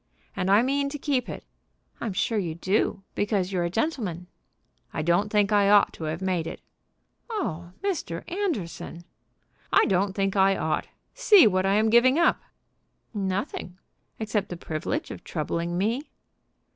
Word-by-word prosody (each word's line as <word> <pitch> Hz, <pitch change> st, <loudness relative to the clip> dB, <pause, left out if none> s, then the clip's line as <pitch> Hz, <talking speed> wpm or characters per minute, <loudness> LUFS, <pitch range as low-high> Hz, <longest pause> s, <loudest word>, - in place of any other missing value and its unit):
"And 190 Hz, -1 st, -1 dB
I 205 Hz, +4 st, +6 dB
mean 280 Hz, +2 st, 0 dB
to 295 Hz, -, -5 dB
keep 270 Hz, -4 st, -1 dB
it." -, -, -7 dB, 0.5 s
"I'm 220 Hz, -4 st, -3 dB
sure 215 Hz, +3 st, 0 dB
you 170 Hz, -5 st, -3 dB
do, 195 Hz, +2 st, 0 dB
because 200 Hz, -3 st, 0 dB
you're 180 Hz, -2 st, 0 dB
a -, -, -1 dB
gentleman." 205 Hz, -, -2 dB, 0.7 s
"I 155 Hz, -, -3 dB
don't 175 Hz, +6 st, +2 dB
think 210 Hz, -1 st, +2 dB
I 205 Hz, -1 st, +4 dB
ought 205 Hz, -1 st, +5 dB
to 160 Hz, -, -6 dB
have 155 Hz, +4 st, -3 dB
made 180 Hz, -4 st, 0 dB
it." -, -, -6 dB, 0.7 s
"Oh, 175 Hz, -, -4 dB
Mr. 305 Hz, -, -2 dB
Anderson!" 250 Hz, -, -3 dB, 0.7 s
"I -, -, +5 dB
don't 190 Hz, +1 st, +1 dB
think 195 Hz, 0 st, -1 dB
I 195 Hz, 0 st, +4 dB
ought. 160 Hz, -, -1 dB, 0.3 s
See 435 Hz, -7 st, +6 dB
what 185 Hz, -2 st, +2 dB
I 195 Hz, -, +3 dB
am 220 Hz, +1 st, +3 dB
giving 255 Hz, +4 st, +5 dB
up." 340 Hz, -, +3 dB, 0.7 s
"Nothing, 190 Hz, -2 st, -3 dB, 0.4 s
except 215 Hz, -2 st, -2 dB
the 175 Hz, -, -5 dB
privilege 170 Hz, -, -3 dB
of -, -, -9 dB
troubling 170 Hz, +2 st, -3 dB
me." 230 Hz, -, -1 dB
200 Hz, 160 wpm, -26 LUFS, 175-235 Hz, 0.7 s, I